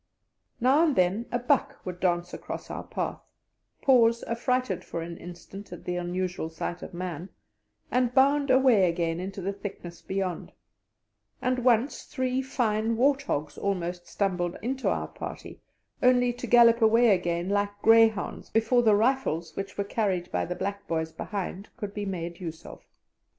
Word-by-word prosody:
Now 265 +6 +4
and 310 -5 +2
then 185 +6 +1
a 245 - +1
buck 250 +3 +1
would 180 -1 -5
dance 175 -1 0
across - - -7
our - - -5
path, - - -4 0.6
pause 235 -3 +4
affrighted 245 -3 -1
for 165 - -5
an 170 0 -7
instant 180 +3 -10
at 175 - -9
the 180 - -2
unusual 180 -1 -2
sight 170 +2 -5
of - - -8
man, 180 0 -5 0.6
and 250 0 +2
bound 280 +2 +3
away 255 -8 +5
again 165 -1 -1
into 190 +1 -5
the 195 +2 -1
thickness 190 -4 -8
beyond; 190 -2 -3 0.9
and 255 0 0
once 245 +2 +2
three 255 0 -1
fine 225 -4 0
wart 275 +3 +3
hogs 150 - -3
almost 180 -3 -2
stumbled 180 -3 -1
into 260 +3 -1
our - - -1
party, - - -8 0.4
only 245 -1 +4
to 245 +1 -7
gallop 235 0 +6
away 230 +2 +5
again 175 -1 -1
like 205 0 +1
greyhounds, 225 -2 +4
before 225 +2 +3
the 220 -3 +5
rifles, 215 - 0
which 195 0 -5
were 200 - 0
carried 195 -4 -1
by - - 0
the 180 - -4
black 200 +2 -4
boys 160 -1 -1
behind, 195 +2 -5
could 205 -4 -5
be 205 -1 -4
made 170 -2 -4
use 165 -3 -7
of. - - -10
200 Hz, 160 wpm, -27 LUFS, 180-245 Hz, 0.9 s, gallop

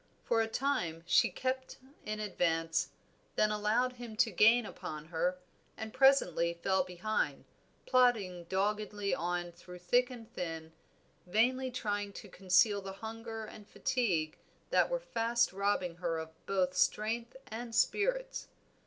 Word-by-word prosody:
For 230 -1 +2
a 225 - +1
time 180 - -1
she - - +4
kept 260 0 -3 0.3
in 215 0 -2
advance, 165 -5 0 0.5
then 215 - +3
allowed 215 +4 +1
him 240 -3 -8
to 225 +1 +3
gain 225 +5 +5
upon 155 -6 -7
her, 175 +2 0 0.4
and 220 0 -6
presently 220 - +4
fell 190 +2 +1
behind, 185 +4 -2 0.4
plodding 220 -9 +2
doggedly 205 +2 -1
on 175 0 -2
through 180 +1 -12
thick 245 +8 +2
and 235 -3 -9
thin, 160 -2 -5 0.5
vainly 255 +7 +2
trying 205 -5 -2
to - - -10
conceal 200 +2 +3
the 195 0 -6
hunger 225 +2 -6
and 210 -1 -12
fatigue 195 -13 0 0.3
that - - +4
were - - 0
fast 235 - +1
robbing 190 -3 0
her 170 -2 -1
of 160 0 -6 0.2
both 185 -2 +1
strength 230 +6 0
and 230 +1 -6
spirits. - - +1
210 Hz, 135 wpm, -33 LUFS, 180-235 Hz, 0.5 s, gain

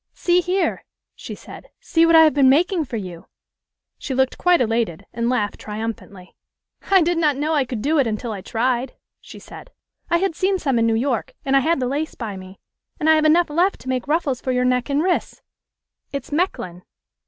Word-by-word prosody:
"See 350 0 +2
here," 360 0 -1 0.3
she - - -9
said. - - -13
"See 330 0 +2
what 330 - +5
I 320 - +9
have 310 - +4
been 275 -2 +4
making 335 +4 +2
for 240 - -5
you!" 180 -5 -8 0.7
She 265 - -4
looked 265 0 0
quite 355 -1 +4
elated, 225 -6 -1
and 235 0 -1
laughed 210 -5 -1
triumphantly. 210 -3 -7 0.5
"I 385 -3 +5
did 340 +1 0
not 300 -4 +2
know 305 +3 -1
I 285 -4 +2
could 240 -4 -5
do 310 +2 +2
it 265 - +2
until 225 +2 -3
I 200 -3 -6
tried," 245 +5 -1 0.2
she - - -13
said. - - -12 0.4
"I 340 - +3
had 380 0 0
seen 380 +2 +1
some 270 -9 0
in 230 - +2
New 225 - +2
York, 245 0 -2
and 270 0 +2
I - - +6
had 320 +3 +1
the 255 - -1
lace 290 +5 -3
by 220 -5 -6
me. 185 0 -11 0.4
And 310 - -1
I - - +7
have 310 0 +2
enough 325 +1 +3
left 355 +6 +1
to 260 - -8
make 255 0 -2
ruffles 295 -4 0
for 260 - -2
your 250 0 +1
neck 250 +1 0
and 285 +2 +1
wrists. 360 0 -2 0.7
It's 280 0 -6
Mechlin." 290 - -2
270 Hz, 210 wpm, -21 LUFS, 230-325 Hz, 0.7 s, I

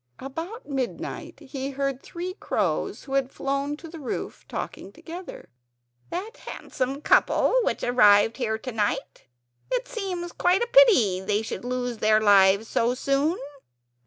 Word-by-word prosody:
About 330 - -7
midnight 265 -4 -4
he 270 -1 -5
heard 275 -1 -2
three 355 +2 -6
crows, - - -1
who 270 - -8
had 270 -1 +1
flown 275 +2 -2
to 330 - -10
the 325 0 -9
roof, 270 - -5
talking - - -6
together. 350 +2 -9 0.6
"That's 410 +7 -6
a - - -3
handsome 270 +2 -4
couple - - +4
which - - -1
arrived 225 -3 +5
here 220 -4 -1
tonight. 220 -3 -3 0.5
It - - 0
seems 370 -7 -4
quite 365 +5 +2
a - - -2
pity 385 - +6
they 205 +3 0
should 220 - -5
lose 245 -2 -3
their 215 0 +4
lives 200 0 +5
so 235 +2 +1
soon." 275 +6 +1
275 Hz, 145 wpm, -25 LUFS, 230-345 Hz, 0.6 s, pity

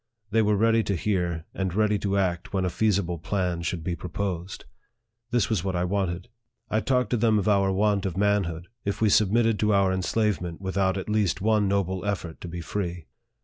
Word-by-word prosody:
They 115 +1 +4
were 105 -1 +3
ready 115 +2 +3
to 100 - 0
hear, 85 -4 -1
and 95 -2 -2
ready 105 -1 +2
to 100 0 0
act 90 -3 -1
when 95 -1 +1
a 90 - -1
feasible 95 -6 0
plan 90 -1 -1
should 85 -1 -3
be 85 +1 -2
proposed. 90 0 -4 0.6
This 120 -4 +2
was 105 -7 0
what 95 -1 -2
I 90 - 0
wanted. 90 -1 -1 0.4
I 110 - +2
talked 125 -1 0
to 120 - +2
them 110 -1 +3
of 100 - 0
our 100 -2 +3
want 100 0 +1
of 95 -1 -5
manhood, 95 -4 0 0.2
if 100 - -2
we 110 - +3
submitted 110 +2 +3
to 105 -1 +2
our 95 -1 +3
enslavement 95 -2 -1
without 95 0 0
at 95 - -5
least 105 -3 +1
one 105 0 +2
noble 95 -1 0
effort 95 -5 -3
to - - -6
be 85 0 -6
free. 90 -2 -4
100 Hz, 200 wpm, -26 LUFS, 90-105 Hz, 0.6 s, They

